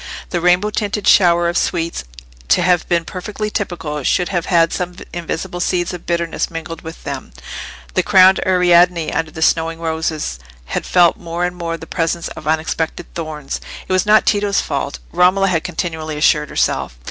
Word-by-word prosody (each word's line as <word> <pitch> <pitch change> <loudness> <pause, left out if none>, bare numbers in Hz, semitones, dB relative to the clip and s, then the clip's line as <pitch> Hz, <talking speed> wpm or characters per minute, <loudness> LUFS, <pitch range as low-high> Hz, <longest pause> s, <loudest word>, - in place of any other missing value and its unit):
The 175 - -1
rainbow 180 +4 +3
tinted 210 -1 -2
shower 175 -2 +5
of 170 - -1
sweets, 165 - -1 0.4
to 175 - +3
have 175 -1 +2
been 170 -1 +1
perfectly 210 +4 -5
typical, 170 -8 -3
should 175 +6 +1
have 175 -4 -2
had 165 -2 +3
some 180 0 -3 0.2
invisible 175 +1 -4
seeds 175 0 0
of 175 - -9
bitterness 170 -1 -1
mingled 165 0 -6
with 165 0 -10
them; 135 - -6 0.6
the - - +3
crowned 190 0 +6
Ariadne, 175 -2 +4
under 160 -1 -1
the 160 0 -3
snowing 165 0 +1
roses, 160 - -2 0.3
had 65 - -3
felt 175 -2 +4
more 170 +1 -3
and 180 0 -3
more 165 -1 -3
the 160 - -10
presence 165 0 -2
of 150 - -9
unexpected 160 +1 -2
thorns. 155 -4 -5 0.3
It - - -1
was 185 +2 +2
not 215 +1 +5
Tito's 205 -1 +2
fault, - - -3
Romola 190 +2 +3
had 165 -3 0
continually 160 -3 -4
assured 150 0 +3
herself. - - -1
170 Hz, 170 wpm, -18 LUFS, 160-180 Hz, 0.6 s, crowned